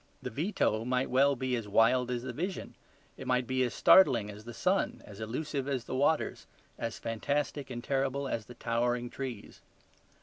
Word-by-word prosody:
The - - -6
veto 135 - 0
might 125 +2 0
well 140 +2 +4
be 130 0 -1
as 115 -3 -4
wild 120 +4 +3
as 120 -1 -2
the 130 -1 -5
vision; 180 +8 -4 0.4
it 130 - -8
might 125 0 +2
be 130 +1 0
as 125 -2 +1
startling 120 - +6
as 105 +1 -12
the 120 - -7
sun, 190 +2 0
as 100 0 -11
elusive 135 +5 -3
as 135 -4 -1
the - - -6
waters, 145 +4 +1 0.3
as 115 -1 -4
fantastic 140 +4 -2
and 120 -2 -6
terrible 135 +1 0
as 115 -4 -3
the 120 - -11
towering 120 +1 -1
trees. 130 -6 -7
125 Hz, 180 wpm, -31 LUFS, 115-140 Hz, 0.4 s, startling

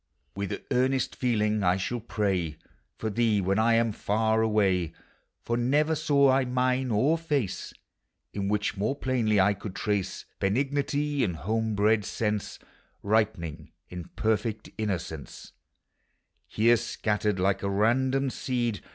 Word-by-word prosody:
With 100 -1 -4
earnest 130 +1 +1
feeling 110 -4 +1
1 90 -2 +2
shall 120 +6 -2
pray 95 -8 -1 0.4
For 110 - -3
thee 110 -1 +2
when 95 +2 +1
1 115 +1 +4
am 115 -1 +2
far 110 +2 +1
away; 95 -6 +1 0.5
For 120 - -1
never 145 +6 +2
saw 140 -3 +3
I 135 +1 +3
mien 130 +1 0
or 135 +10 +2
face 145 - -2 0.6
In 100 -1 -2
which 105 0 0
more 105 +7 -1
plainly 120 -7 +1
I 100 +2 +4
could 100 -1 -8
trace 105 -3 -2
Benignity 140 +6 0
and 90 - -1
home 110 +5 -1
bred 105 +1 +3
sense 105 -1 -2 0.5
Ripening 100 -8 -1 0.2
in 90 -2 -7
perfect 110 0 -1
innocence, 85 -8 -5 1.1
llere 115 +2 +5
scattered 105 -3 -1
like 95 +1 +1
a 100 - -1
random 130 +6 +2
seed. 120 -6 -2
110 Hz, 135 wpm, -27 LUFS, 100-125 Hz, 1.1 s, llere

